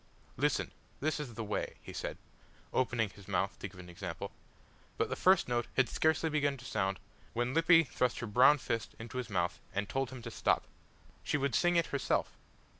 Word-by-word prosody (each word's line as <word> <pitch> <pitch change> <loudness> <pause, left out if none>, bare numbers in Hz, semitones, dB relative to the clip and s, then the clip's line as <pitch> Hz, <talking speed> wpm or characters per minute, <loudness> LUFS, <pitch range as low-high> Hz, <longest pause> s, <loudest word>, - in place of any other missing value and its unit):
"Listen, - - +1 0.3
this 155 +2 0
is 130 -6 -5
the 115 - -3
way," 105 -1 -2
he - - -8
said, - - -4 0.6
opening 120 -4 +1
his 100 -1 -15
mouth 95 0 0
to - - -4
give 95 0 -14
an 90 - -9
example; 90 +1 -6 0.7
but - - +1
the - - -1
first 190 +1 +4
note 120 -1 0
had 135 -2 +5
scarcely 160 0 +2
begun 145 -3 +1
to 120 - -12
sound 95 -5 0 0.4
when 120 +2 0
Lippy 165 +1 +6
thrust 125 -3 0
her 120 - -3
brown 125 +7 +6
fist 115 -4 -3
into 115 +3 -5
his 120 -2 -4
mouth, 90 -3 0 0.2
and 100 0 0
told 135 +6 -1
him 130 -3 -9
to 115 - -6
stop. - - +2 0.6
She - - +1
would 140 -2 0
sing 175 0 +3
it 170 -1 +4
herself! 140 - 0
120 Hz, 195 wpm, -33 LUFS, 100-145 Hz, 0.7 s, Lippy